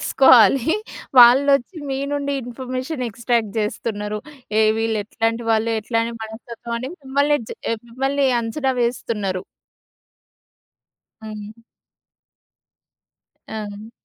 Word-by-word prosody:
తెలుసుకోవాలి. 265 Hz, +2 st, +5 dB, 0.4 s
వాళ్లొచ్చి 275 Hz, +6 st, +6 dB
మీ 270 Hz, -, -1 dB
నుండి 280 Hz, -1 st, -1 dB
information 255 Hz, +3 st, -4 dB
extract 230 Hz, 0 st, -1 dB
చేస్తున్నారు. 210 Hz, -1 st, -3 dB, 0.4 s
"ఏ! -, -, +5 dB, 0.2 s
వీళ్ళు 225 Hz, -1 st, 0 dB
ఎట్లాంటి 225 Hz, +2 st, -1 dB
వాళ్ళు 225 Hz, +1 st, +2 dB
ఎట్లాంటి 230 Hz, +1 st, -1 dB
మనస్తత్వం" 235 Hz, +1 st, -7 dB
అని 255 Hz, +3 st, -5 dB
మిమ్మల్ని 285 Hz, +2 st, +2 dB
జ -, -, -10 dB, 0.4 s
మిమ్మల్ని 270 Hz, +3 st, 0 dB
అంచనా 260 Hz, +4 st, -1 dB
వేస్తున్నారు. 210 Hz, -6 st, -2 dB, 1.8 s
హ్మ్. 215 Hz, -1 st, -7 dB, 2.0 s
ఆ! 215 Hz, 0 st, -7 dB
235 Hz, 90 wpm, -21 LUFS, 220-265 Hz, 2.0 s, వాళ్లొచ్చి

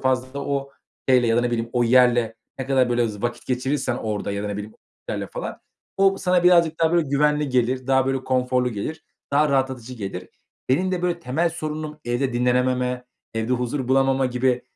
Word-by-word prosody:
fazla 130 Hz, +1 st, -1 dB
o 140 Hz, 0 st, -2 dB, 0.4 s
eyle 125 Hz, -2 st, +5 dB
ya 115 Hz, 0 st, +2 dB
da -, -, +4 dB
ne 120 Hz, 0 st, 0 dB
bileyim 115 Hz, -1 st, -2 dB
o 120 Hz, -1 st, +2 dB
yerle 120 Hz, -2 st, +4 dB, 0.2 s
ne 130 Hz, -, -4 dB
kadar, 130 Hz, -2 st, +3 dB
böyle, 120 Hz, -1 st, +2 dB
z 105 Hz, 0 st, -8 dB
vakit 120 Hz, 0 st, -3 dB
geçirirsen 130 Hz, 0 st, -1 dB
orada 105 Hz, -3 st, -3 dB
ya 100 Hz, 0 st, -3 dB
da 105 Hz, -, -2 dB
ne 100 Hz, -, -3 dB
bileyim 105 Hz, +1 st, -7 dB, 0.4 s
yerle -, -, -3 dB
falan. -, -, -6 dB, 0.4 s
O 195 Hz, 0 st, +3 dB
sana 180 Hz, -1 st, +2 dB
birazcık 170 Hz, -3 st, +4 dB
daha, 165 Hz, 0 st, +3 dB
böyle, 170 Hz, -4 st, +2 dB
güvenli 150 Hz, +1 st, +2 dB
gelir. 125 Hz, +1 st, 0 dB
Daha, 130 Hz, -1 st, +3 dB
böyle, 135 Hz, -1 st, -1 dB
konforlu 125 Hz, -1 st, +1 dB
gelir. 115 Hz, +9 st, -5 dB, 0.3 s
Daha 150 Hz, +2 st, +4 dB
rahatlatıcı 130 Hz, -3 st, -1 dB
gelir. 95 Hz, -5 st, -6 dB, 0.4 s
Benim 175 Hz, +9 st, +2 dB
de, 180 Hz, -1 st, -2 dB
böyle, 175 Hz, -1 st, 0 dB
temel 165 Hz, +4 st, 0 dB
sorunum 155 Hz, -2 st, -5 dB
evde 120 Hz, +2 st, -1 dB
dinlenememe, 125 Hz, +1 st, +1 dB, 0.3 s
evde 115 Hz, +2 st, -1 dB
huzur 125 Hz, +1 st, -2 dB
bulamama 135 Hz, 0 st, +3 dB
gibi 125 Hz, 0 st, 0 dB
130 Hz, 190 wpm, -23 LUFS, 120-145 Hz, 0.4 s, eyle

